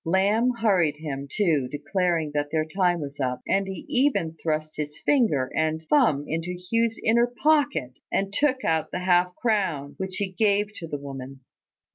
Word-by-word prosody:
Lamb 200 +7 +2
hurried 185 -10 +2
him, 140 -3 -5
too, 155 -8 +1
declaring 160 +2 -1
that 145 0 -1
their 155 0 0
time 175 +1 +1
was 145 -1 -7
up; 125 -2 -1
and 195 0 +1
he 190 - -6
even 250 - +1
thrust 155 -1 -2
his 150 0 -4
finger 210 - +2
and 155 0 +1
thumb 220 - +4
into 165 +3 -3
Hugh's 230 +5 0
inner 235 +2 +4
pocket, 285 - +1 0.2
and 195 0 -1
took 265 +1 +1
out 160 -1 +1
the 180 - -4
half 180 0 +2
crown, 185 - -1
which 190 -1 -4
he 200 -2 -2
gave 205 +1 +1
to 165 - -6
the 145 - -4
woman. 135 -1 -8
180 Hz, 170 wpm, -25 LUFS, 150-210 Hz, 0.2 s, thumb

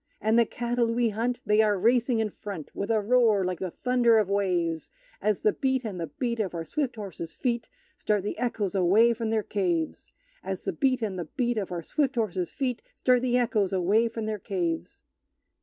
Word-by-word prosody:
And 220 +2 +3
the 230 - +4
cattle 240 -1 0
we 235 0 +2
hunt 235 +4 -1
they 210 +1 +4
are 210 -2 +2
racing 235 +4 +3
in 220 -2 0
front, 190 -8 -8
With 200 - -4
a 225 -1 +3
roar 220 -3 +3
like 180 -1 -2
the 185 - -3
thunder 240 +3 +3
of 210 -3 +2
waves, 175 -5 0 0.3
As 210 -2 +1
the 215 - +4
beat 260 -2 0
and 195 -5 -4
the 165 - -2
beat 235 - -3
of 190 -5 -2
our 165 -1 -4
swift 280 - -2
horses' 190 -6 -7
feet 235 -3 -2 0.3
Start 210 -3 0
the 205 - -3
echoes 225 -6 -1
away 200 +5 +4
from 230 -1 -3
their 220 -1 +1
caves! 175 -6 -2 0.3
As - - -4
the - - -2
beat 260 -4 +1
and 195 -4 -2
the 170 - -3
beat 240 - -1
Of 195 -3 -4
our 170 -2 -4
swift 270 - 0
horses' 190 -6 -1
feet 255 -3 -2
Start 250 -1 +3
the 250 -1 +2
echoes 220 -6 +1
away 200 +5 +3
from 225 -1 -5
their 215 -1 -3
caves! 175 -4 -3
215 Hz, 205 wpm, -27 LUFS, 190-240 Hz, 0.3 s, the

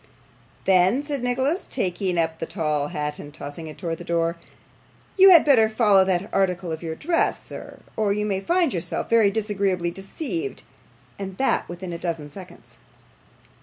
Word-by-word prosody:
'Then,' 190 +8 +4
said 290 -3 -3
Nicholas, 260 +8 0
taking 185 -4 -1
up 160 -1 0
the 165 - -4
tall 150 -5 -1
hat 150 0 -4
and 145 - -9
tossing 145 +3 -7
it 155 - -9
towards 165 -3 -4
the - - -7
door, 170 0 0 0.8
'you 390 0 +8
had 345 -4 +8
better 235 -7 +5
follow 210 -4 +4
that 190 +1 0
article 180 -3 0
of 160 - -4
your 160 -2 -4
dress, 330 - 0
sir, - - -9 0.2
or 215 -2 +1
you 210 +1 0
may 195 -2 -1
find 345 - +1
yourself 170 -3 -2
very 225 -3 +5
disagreeably 200 -4 -1
deceived, 305 - -5 0.6
and 190 -1 -6
that 270 - +1
within 175 0 -6
a 170 - -5
dozen 160 -4 -4
seconds. 185 +3 -13
190 Hz, 165 wpm, -24 LUFS, 170-225 Hz, 0.8 s, you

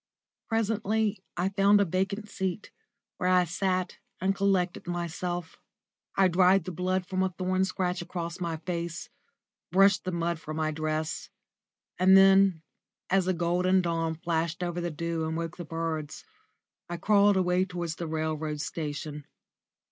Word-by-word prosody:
Presently 220 -2 0 0.2
I 180 +2 +1
found 200 +1 +4
a 200 - +4
vacant 195 +4 -2
seat, 190 0 -4 0.5
where 180 - 0
I 180 -1 +5
sat 185 +1 -1 0.2
and 190 +2 +1
collected 195 -3 0
myself. 175 0 -4 0.6
I 195 -1 +5
dried 185 +1 +4
the 185 - -5
blood 180 +2 -1
from 185 +1 -2
a 190 - +2
thorn 185 +1 0
scratch 185 -1 -2
across 175 0 -5
my 170 -2 -2
face, 170 0 -4 0.6
brushed 195 +1 +5
the 185 - -2
mud 170 -1 -1
from 155 0 -6
my 155 -1 0
dress, 155 0 -3 0.7
and 190 +1 +7
then, 195 -3 +5 0.5
as 190 -1 +3
a 185 - +2
golden 180 +2 +2
dawn 165 -1 -1
flashed 165 +1 -2
over 175 0 -2
the 175 - -2
dew 165 +1 -3
and 160 0 -2
woke 165 0 -4
the 175 - -6
birds, 160 -2 -4 0.7
I 175 - -3
crawled 205 +2 +4
away 180 0 +2
towards 175 -3 -4
the 170 - -4
railway 155 -1 -2
station. 150 -1 -5
180 Hz, 150 wpm, -28 LUFS, 165-190 Hz, 0.7 s, and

